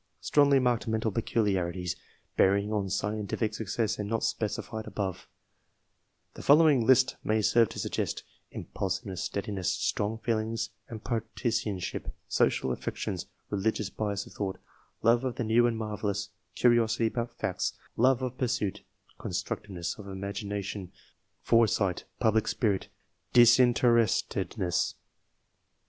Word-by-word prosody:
Strongly 145 -1 +4
marked 125 -3 +1
mental 110 0 0
peculiarities, 95 -5 0 0.4
bearing 100 +2 +3
on 100 -2 -1
scientific 105 +2 -1
success, 110 0 -2
and 105 0 -3
not 115 0 -1
specified 110 0 -2
above: 95 -3 -4 1.1
the - - -9
following 145 -4 +6
list 130 0 +5
may 110 +1 +1
serve 115 +1 +4
to - - -9
suggest - - -2
— - - -42
impulsiveness, 95 -1 -4
steadiness, 100 -3 -2
strong 105 +2 -1
feelings 110 0 -1 0.2
and 110 -2 -8
partisanship, 115 -4 -2 0.2
social 65 - +1
affections, 90 +8 -4 0.2
religious 105 0 -1
bias 100 -2 -2
of - - -14
thought, 95 -2 -3 0.5
love 115 +2 +4
of 130 -2 -2
the - - -2
new 115 +2 +4
and 115 -1 -1
marvellous, 105 -2 -3 0.3
curiosity 120 -1 +3
about 115 +1 -2
facts, 100 -5 -1 0.2
love 130 +2 +3
of 130 0 -4
pursuit, 110 -6 -1 0.4
constructiveness 95 -1 -4
of 100 - -9
imagination, 100 0 -4 0.5
foresight, 110 -5 +2
public 110 -2 +2
spirit, 105 -6 0 0.5
disinterestedness. 120 -6 +3
110 Hz, 120 wpm, -29 LUFS, 100-115 Hz, 1.1 s, following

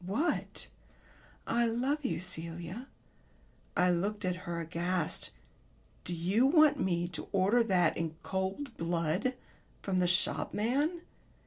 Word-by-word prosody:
"What?" 215 - -1 0.8
"'I 235 0 +2
love 260 +6 0
you, 255 - -1
Celia.'" 175 +5 -5 0.9
I 180 0 +5
looked 200 +4 -1
at 180 -1 +1
her 170 -1 -2
aghast. 170 +1 -1 0.8
"Do 175 - -2
you 190 +10 +3
want 300 -1 +6
me 175 -2 +1
to 175 - -6
order 200 +5 +4
that 180 -6 +3
in 160 -1 -2
cold 195 +8 -3
blood 170 +8 0 0.5
from 190 -2 +1
the 180 - +3
shopman?" 250 - +1
190 Hz, 120 wpm, -32 LUFS, 175-240 Hz, 0.9 s, want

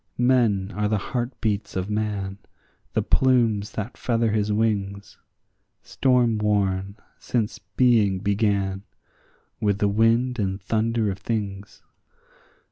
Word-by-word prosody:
Men 115 -6 +2
are 105 0 0
the 105 0 +1
heartbeats 110 -2 -3
of 95 0 -2
man, 105 -2 -3 0.5
the - - +1
plumes 115 -6 +2
that 110 +2 -5
feather 115 -2 0
his 105 0 0
wings, 100 -2 -1 0.6
Storm 125 -4 +2
worn, 100 -1 0 0.2
since 115 -2 -2
being 110 -7 +2
began, 100 -1 0 0.8
with 105 -3 +1
the 100 - +1
wind 115 +4 +2
and 95 -1 -1
thunder 110 +1 0
of 95 - -7
things. 100 -2 -4
105 Hz, 115 wpm, -24 LUFS, 100-115 Hz, 0.8 s, Men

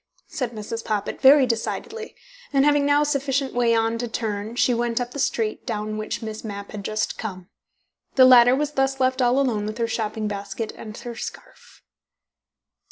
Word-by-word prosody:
"Nothing," 235 -5 -4
said 225 +2 -4
Mrs. - - -20
Poppit 210 -2 -3
very 270 0 +7
decidedly, 445 - -4 0.4
and 275 -1 +3
having 290 -1 +3
now 290 +1 +4
sufficient 275 -2 -1
way 235 -1 +2
on 225 0 +1
to 240 - -2
turn, 220 -1 -4
she 245 0 +3
went 235 0 0
up 245 0 -3
the 285 - -6
street 225 -4 -1
down 215 -1 -3
which 215 +2 -4
Miss 220 -1 -6
Mapp 200 -2 -7
had 210 -2 -7
just 215 +2 -2
come. 185 -4 -6 0.7
The 260 - +8
latter 250 -1 +7
was 295 +1 -1
thus 270 -1 0
left 260 0 +1
all 245 +1 +3
alone 225 -6 0
with 215 - -5
her 230 -1 0
shopping 220 -1 -2
basket 205 +2 -4
and 215 0 -9
her 240 -1 -7
scarf. - - -10
235 Hz, 185 wpm, -23 LUFS, 215-270 Hz, 0.7 s, The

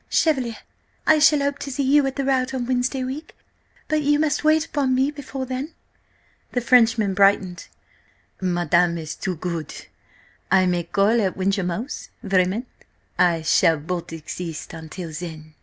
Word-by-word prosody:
Chevalier, 260 -8 +1 0.5
I 315 0 +5
shall 300 -1 +5
hope 280 0 -1
to 280 - -5
see 275 +2 -1
you 275 +1 +4
at 270 - -4
the 275 - -2
rout 265 -1 +1
on 250 -2 -2
Wednesday 255 +1 0
week, 270 +5 -6 0.5
but 310 0 +1
you 290 0 +3
must 305 0 0
wait 310 +1 +3
upon 275 -5 0
me 265 +3 +2
before 275 -2 -6
then." 260 +5 -5 0.8
The 245 - 0
Frenchman 225 -4 +4
brightened. 195 -2 +2 0.7
"Madame 175 -1 +2
is 160 -1 -5
too 185 - -4
good. 165 -2 -4 0.8
I 190 -1 +4
may 175 -1 +1
then - - -15
call 210 +4 +3
at 190 -3 -1
Wyncham 195 -1 0
'Ouse? 225 +11 -5
Vraiment, 190 +4 +1 0.5
I 170 -2 +3
shall 160 +1 +4
but 170 +4 -5
exist 165 0 -6
until 165 +1 -7
then!" 155 -1 -8
220 Hz, 160 wpm, -23 LUFS, 175-270 Hz, 0.8 s, I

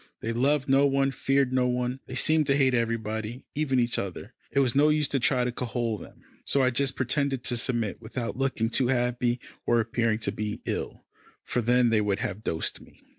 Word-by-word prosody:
They 115 - -2
loved 140 +3 +1
no 135 +1 +4
one, 135 0 +1
feared 135 -1 +1
no 125 -1 +2
one; 125 +1 -1
they 130 - -6
seemed 155 +2 +3
to 140 - +3
hate 130 -2 +3
everybody, 115 0 -2
even 140 -3 +1
each 120 0 +1
other. 100 +4 -6 0.2
It 140 - +1
was 130 -3 +3
of 135 - -3
no 150 +2 +5
use 150 -1 +2
to 135 - 0
try 125 +1 +2
to 125 - -1
cajole 120 -3 -2
them, - - -13 0.2
so 140 - +2
I 130 - +3
just 135 +2 0
pretended 135 0 0
to 120 - 0
submit, 115 -4 -1
without 115 +1 -4
looking 130 -4 -1
too 125 +1 +2
happy 125 -1 0 0.3
or 120 - +4
appearing 115 -1 0
to 100 - +1
be 105 +1 -4
ill, - - -4 0.4
for 125 - -1
then 120 +1 +3
they 110 -1 +3
would 100 -2 0
have 105 0 -4
dosed 80 -5 -2
me. - - -19
125 Hz, 215 wpm, -27 LUFS, 115-135 Hz, 0.4 s, no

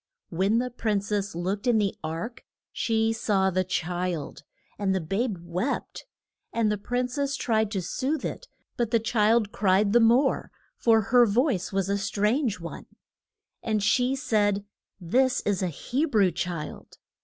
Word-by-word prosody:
When 190 +6 +2
the 250 +1 -1
prin 215 -4 0
cess 205 -1 -2
looked 190 +6 -2
in 240 -2 +4
the 205 -2 +1
ark 165 +10 -5 0.3
she 225 -1 +1
saw 195 -4 +1
the 185 +1 +1
child. 180 -3 -3 0.4
And 195 -2 +1
the - - +1
babe 195 +6 -1
wept. 180 - -3 0.4
And 225 -2 +1
the 210 - -2
prin 245 +4 -1
cess 280 +2 -2
tried 220 -5 +1
to 195 -4 -3
soothe 275 - -2
it, - - -5 0.3
but 240 -2 0
the 230 - +3
child 220 -1 +2
cried 200 +1 +2
the 240 - +6
more, 240 +4 +3 0.3
for 225 -1 +4
her 240 +3 +4
voice 225 - +1
was 195 -1 0
a 200 0 0
strange 210 +3 0
one. 170 -1 -8 0.7
And 215 -2 -1
she 250 +5 +2
said, 210 -6 +1 0.3
This 245 +9 +2
is 200 -2 -1
a 185 - +1
He 245 - -1
brew 210 - +3
child. 170 -5 -5
210 Hz, 160 wpm, -26 LUFS, 190-240 Hz, 0.7 s, the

